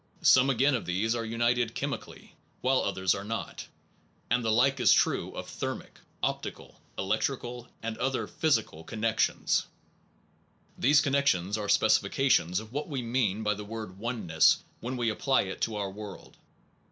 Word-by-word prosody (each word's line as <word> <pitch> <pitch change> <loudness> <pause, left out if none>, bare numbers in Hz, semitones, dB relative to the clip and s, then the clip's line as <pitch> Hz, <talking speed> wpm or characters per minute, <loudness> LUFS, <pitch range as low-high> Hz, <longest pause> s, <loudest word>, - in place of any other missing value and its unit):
Some 130 +1 +6
again 135 +2 +3
oneness 120 -7 -2
o - - +1
f 90 - -1
^hese 110 +4 +1 0.2
are - - -4
un 115 - -4
ited 120 -2 -2
chemically, - - -5 0.3
while 130 +1 +3
others 95 -2 +1
are 100 - -5
not; 115 +2 -5 0.6
and 120 0 +2
the 110 - +1
like 130 +5 +3
is 125 - +5
true - - +3
of - - -6
thermic, - - -6 0.2
optical, - - -4 0.2
electrical, 120 0 -2 0.2
and 115 0 -4
other 135 -1 0
physical 110 - 0
connec 110 +4 -2
tions. - - +1 1.1
These 140 +2 +4
connections 135 -10 +1
are 105 -2 -3
specifications 100 -9 +3
of 110 +2 -11
what 145 +4 -3
we 135 -4 -3
mean 115 -3 0
by 105 0 +2
the 105 0 -7
word 105 -3 -7
oneness 105 -9 +2 0.2
when 125 +2 -4
we 120 -2 +1
apply 135 +5 +2
it 95 -1 -7
to 110 - -1
our 100 -2 -3
world. 105 -1 -10
115 Hz, 165 wpm, -29 LUFS, 105-130 Hz, 1.1 s, Some